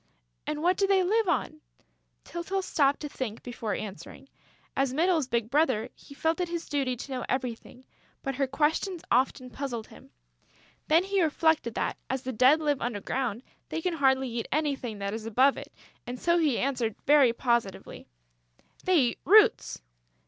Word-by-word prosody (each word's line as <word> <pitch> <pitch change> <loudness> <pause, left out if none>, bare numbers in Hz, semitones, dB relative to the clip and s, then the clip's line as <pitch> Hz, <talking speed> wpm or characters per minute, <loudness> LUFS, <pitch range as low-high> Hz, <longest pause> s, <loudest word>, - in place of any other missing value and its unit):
"And 300 +1 -3
what 360 +2 +3
do 395 - +2
they 385 -1 +3
live 425 +2 +1
on?" 310 0 -1 0.6
Tyltyl 375 +3 -3
stopped 280 -5 +1
to 300 - -3
think, 235 -5 -5
before 235 -3 -4
answering. 210 - -8 0.5
As 270 -1 0
Mytyl's 325 -3 +2
big 235 -2 -1
brother, 260 -7 +2
he 280 - -15
felt 320 +4 0
it 355 - -2
his 340 -1 -4
duty 270 -3 -1
to 260 +3 -9
know 255 - -3
everything; 250 0 -4 0.4
but 270 - -2
her 275 -1 +1
questions 315 +6 0
often 255 0 +1
puzzled 245 -5 -4
him. - - -15 0.8
Then 325 +3 +4
he 390 0 0
reflected 315 -6 +1
that, - - -2
as 265 0 -2
the 260 - -4
Dead 255 +7 +5
live 290 -3 0
under 235 -3 -2
ground, 240 +1 -3 0.3
they - - -3
can 355 +1 -1
hardly 265 -3 +2
eat 235 -1 -4
anything 275 -7 -1
that 200 0 -3
is 220 0 -5
above 260 +5 +4
it; - - -9 0.4
and 245 +1 -5
so 340 0 +2
he 300 -7 +2
answered 245 -5 -1
very 285 -4 +6
positively: 235 -4 -2 0.8
"They 370 -1 +3
eat 250 -5 +2
roots!" 415 - +4
270 Hz, 170 wpm, -28 LUFS, 240-320 Hz, 0.8 s, very